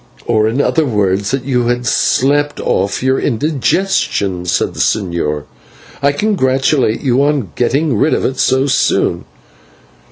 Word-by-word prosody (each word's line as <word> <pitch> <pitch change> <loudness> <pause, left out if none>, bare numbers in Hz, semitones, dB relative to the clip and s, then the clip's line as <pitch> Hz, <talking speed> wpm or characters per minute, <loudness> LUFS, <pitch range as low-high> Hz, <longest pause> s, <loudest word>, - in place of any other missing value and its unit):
"Or 110 -2 +2
in 115 +5 -1
other 160 +2 +2
words, 100 -6 0
that 135 -2 -2
you 125 -3 0
had 120 0 -1
slept 145 +5 +1
off 100 +5 -1
your 130 0 +2
indigestion," 130 - -1
said 85 - 0
the - - -10
señor. 85 -7 -1 0.6
"I 140 - +3
congratulate 135 - +1
you 130 -2 +1
on 140 - 0
getting 135 +3 0
rid 150 +9 +2
of - - -2
it 130 0 -2
so 130 +1 +2
soon." 140 - 0
130 Hz, 140 wpm, -15 LUFS, 105-140 Hz, 0.6 s, I